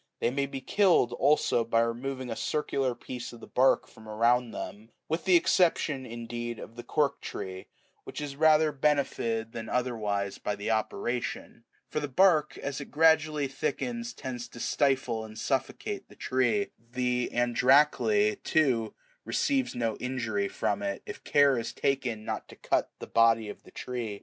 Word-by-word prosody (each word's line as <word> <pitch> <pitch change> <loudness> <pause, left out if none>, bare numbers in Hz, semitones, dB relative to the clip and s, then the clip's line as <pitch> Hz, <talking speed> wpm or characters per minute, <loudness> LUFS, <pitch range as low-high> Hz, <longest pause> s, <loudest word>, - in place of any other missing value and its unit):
They 120 - +1
may 140 +1 -1
be 135 -1 -6
killed, 175 -8 +3
also, 135 -3 +3
by 115 0 +2
removing 125 +2 -3
a - - -2
circular 135 -4 -1
piece 125 0 -7
of 120 - -11
the - - -10
bark 130 +1 +3
from 110 0 -14
around 120 +3 +2
them, 110 0 -7 0.2
with 160 +2 -2
the 185 -2 +5
exception, 160 -6 +2
in 115 0 -7
deed, 120 0 -4
of 115 - -10
the 120 - -7
cork 140 +3 0
tree,9 95 0 -6 0.4
which - - -7
is 145 -2 -5
rather 155 +1 +5
benefitted 135 -6 0
than 115 -1 -6
other 125 -1 0
wise 100 -2 -2
by 105 - -2
the 105 +2 -3
operation; 120 +1 -3 0.2
for - - -2
the 145 - -3
bark 155 +1 +3
as 140 0 -4
it 140 - -9
gradually 155 -2 +3
thickens 235 - -3
tends 125 - -6
to 120 - -12
stifle 130 -5 +1
and 110 0 -10
suffocate - - -2
the - - -15
tree: 130 - 0 0.2
the 125 -1 0
andrachle,10 150 - +3
too, 125 -8 +1 0.3
re - - -5
ceives 270 - +1
no 115 -3 -1
injury 115 -6 -2
from 100 0 -1
it, 100 -1 -3
if - - -8
care 140 -3 +4
is 115 - -5
taken 120 -5 -1
not - - -4
to - - -13
cut - - 0
the - - -7
body 115 -1 +3
of - - -9
the - - -17
tree. 115 -5 -5
125 Hz, 175 wpm, -29 LUFS, 115-145 Hz, 0.4 s, the